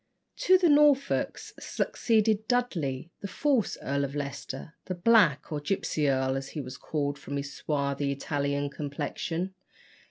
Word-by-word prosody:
To 370 - +5
the 360 -2 +3
Norfolks 290 -2 +3
succeeded 220 -1 +1
Dudley, 170 - -1
the 200 - -5
false 260 +2 +1
Earl 140 +1 0
of 140 +1 -4
Leicester, 140 +1 -5
the 185 - -3
black 175 -7 +4
or 150 - -1
gipsy 150 -2 0
earl, 130 0 +1
as 135 0 -4
he - - -6
was 130 -2 -6
called 145 -1 -2
from 140 0 -5
his 140 0 -5
swarthy 140 -1 -1
Italian 140 0 -1
complexion. 155 +5 -3
145 Hz, 145 wpm, -28 LUFS, 140-205 Hz, -, To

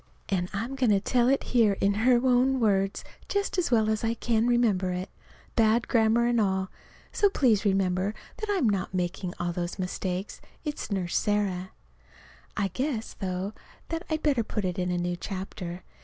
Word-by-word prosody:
And 180 -2 0
I'm 225 +6 -3
going 265 -3 +1
to 200 -1 +4
tell 240 +4 +2
it 275 - +2
here 225 -5 +3
in 200 +1 +3
her 240 +5 +4
own 260 +1 +3
words, 195 -3 +1 0.3
just 400 -2 0
as 355 - +1
well 220 -3 +3
as 215 0 0
I 225 +1 +1
can 230 0 +1
remember 220 -6 +2
it 180 +1 -4 0.4
bad 225 +1 +3
grammar 230 0 +3
and 240 -1 +2
all. 190 -2 0 0.4
So 410 - +3
please 230 - +2
remember 195 +1 +1 0.2
that 430 - -5
I - - +3
am 295 -11 +2
not 195 -2 -1
making 180 0 -2
all 175 0 -1
those 175 +1 -3
mistakes. 185 +1 -3 0.2
It's 295 -6 -4
Nurse 185 -3 -1
Sarah. 195 -3 0 0.9
I 200 -2 +1
guess, 245 - -3
though, 190 +1 -3 0.4
that 330 0 -2
I'd 315 -1 -1
better 275 -6 +2
put 210 -2 -3
it 180 0 -2
into 180 0 0
a - - 0
new 175 0 -1
chapter. 185 -2 -6
210 Hz, 185 wpm, -27 LUFS, 185-240 Hz, 0.9 s, to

